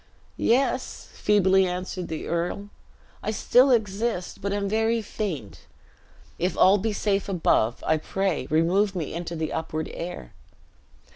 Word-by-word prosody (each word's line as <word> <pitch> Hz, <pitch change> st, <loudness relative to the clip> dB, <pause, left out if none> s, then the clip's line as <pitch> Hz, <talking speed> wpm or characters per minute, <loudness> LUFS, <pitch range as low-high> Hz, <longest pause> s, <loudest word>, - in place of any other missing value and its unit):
"Yes," 255 Hz, +1 st, 0 dB
feebly 190 Hz, -2 st, +3 dB
answered 180 Hz, 0 st, -4 dB
the 160 Hz, -1 st, -5 dB
earl, 175 Hz, +4 st, -2 dB, 0.5 s
"I -, -, -3 dB
still 245 Hz, +5 st, +4 dB
exist, 215 Hz, -4 st, 0 dB
but 200 Hz, -, -2 dB
am 200 Hz, 0 st, -1 dB
very 225 Hz, +2 st, +1 dB
faint. 185 Hz, -, -5 dB, 0.7 s
If 180 Hz, +2 st, -1 dB
all 195 Hz, +2 st, +6 dB
be 220 Hz, +3 st, -1 dB
safe 200 Hz, -1 st, 0 dB
above, 140 Hz, -, +1 dB
I 160 Hz, -, +3 dB
pray 180 Hz, -3 st, -2 dB
remove 185 Hz, +6 st, +2 dB
me 165 Hz, -5 st, -3 dB
into 170 Hz, 0 st, -4 dB
the 160 Hz, -1 st, -3 dB
upward 160 Hz, -1 st, -3 dB
air!" 170 Hz, -, -7 dB
190 Hz, 135 wpm, -25 LUFS, 170-210 Hz, 0.7 s, all